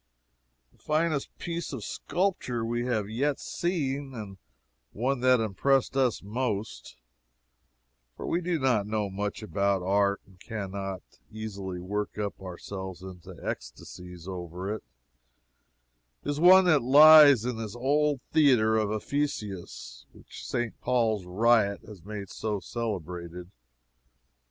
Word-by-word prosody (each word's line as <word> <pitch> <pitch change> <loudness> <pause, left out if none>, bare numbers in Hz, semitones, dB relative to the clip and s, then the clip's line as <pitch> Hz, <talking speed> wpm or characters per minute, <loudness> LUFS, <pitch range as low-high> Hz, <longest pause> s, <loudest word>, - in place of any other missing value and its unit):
The - - -30
finest 155 -2 -1
piece 170 0 -4
of 130 -7 -6
sculpture 150 - -2
we 120 +1 -2
have 110 -5 0
yet 135 +6 -1
seen 140 -6 -2
and 100 -4 -8 0.6
the - - -14
one 130 +2 0
that 125 0 +4
impressed 125 +6 +1
us 130 -6 +1
most, 110 -1 -4 1.2
(for - - -6
we 170 - 0
do 175 -1 0
not 125 -8 +1
know 105 -2 -2
much 105 +2 -4
about 100 0 0
art 100 +1 +2
and 95 -2 -22
can 100 -2 -6
not 95 -1 -5 0.3
easily 100 -4 -6
work 105 +4 -4
up 105 -2 -4
ourselves 95 0 -7
into 90 -1 -10
ecstasies 90 +8 -7
over 90 +1 -5
it,) 110 - -7 1.4
is 145 0 -2
one 185 +2 +8
that 155 -5 +4
lies 145 -1 +8
in 125 -2 -2
this 110 -2 -6
old 145 +2 +1
theatre 125 -8 +4
of 105 -2 +1
Ephesus 105 - -4
which - - -12
St. 120 -1 -3
Paul's 115 -6 +1
riot 105 +1 +2
has 105 -5 -12
made 100 -1 -7
so 105 -2 -3
celebrated. 90 -5 -5
110 Hz, 130 wpm, -28 LUFS, 95-135 Hz, 1.4 s, one